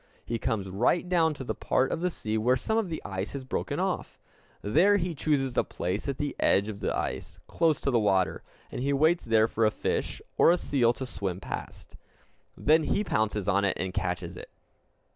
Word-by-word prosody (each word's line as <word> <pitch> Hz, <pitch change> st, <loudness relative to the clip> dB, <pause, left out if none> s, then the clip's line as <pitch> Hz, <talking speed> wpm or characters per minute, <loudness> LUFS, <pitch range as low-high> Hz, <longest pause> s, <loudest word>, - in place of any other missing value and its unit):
He 115 Hz, 0 st, -2 dB
comes 110 Hz, -5 st, -1 dB
right 120 Hz, -, +1 dB
down 165 Hz, -4 st, +2 dB
to 135 Hz, -, -6 dB
the -, -, -2 dB
part 130 Hz, -, 0 dB
of -, -, -2 dB
the 180 Hz, -, +1 dB
sea 110 Hz, -10 st, -3 dB
where 120 Hz, +4 st, +3 dB
some 220 Hz, -, -1 dB
of 225 Hz, -5 st, 0 dB
the 160 Hz, -, -5 dB
ice 95 Hz, 0 st, -4 dB
has 140 Hz, -1 st, -5 dB
broken 130 Hz, -, -3 dB
off. -, -, -2 dB, 0.5 s
There 175 Hz, -, +4 dB
he 175 Hz, -2 st, -2 dB
chooses 135 Hz, -4 st, 0 dB
a -, -, +3 dB
place 95 Hz, +8 st, -3 dB
at 135 Hz, -, -2 dB
the 145 Hz, -1 st, -3 dB
edge 100 Hz, +2 st, +3 dB
of 100 Hz, -2 st, -6 dB
the -, -, -1 dB
ice, -, -, -4 dB
close 165 Hz, -3 st, +1 dB
to 140 Hz, -, 0 dB
the 120 Hz, -, +3 dB
water; 95 Hz, -4 st, +1 dB, 0.3 s
and -, -, -4 dB
he 140 Hz, +2 st, +1 dB
waits 160 Hz, +5 st, +3 dB
there 110 Hz, -1 st, +4 dB
for 115 Hz, -, -1 dB
a 110 Hz, -, +5 dB
fish 105 Hz, -, -2 dB, 0.2 s
or -, -, +7 dB
a 175 Hz, -, +5 dB
seal 125 Hz, -8 st, +2 dB
to 130 Hz, -, -5 dB
swim 95 Hz, -7 st, -4 dB
past. -, -, -7 dB, 0.6 s
Then 155 Hz, +1 st, +3 dB
he 210 Hz, -, +1 dB
pounces 105 Hz, -, -1 dB
on 100 Hz, 0 st, +2 dB
it 100 Hz, -, +1 dB
and 95 Hz, -1 st, -2 dB
catches 90 Hz, -1 st, -3 dB
it. -, -, -9 dB
120 Hz, 215 wpm, -28 LUFS, 100-155 Hz, 0.6 s, or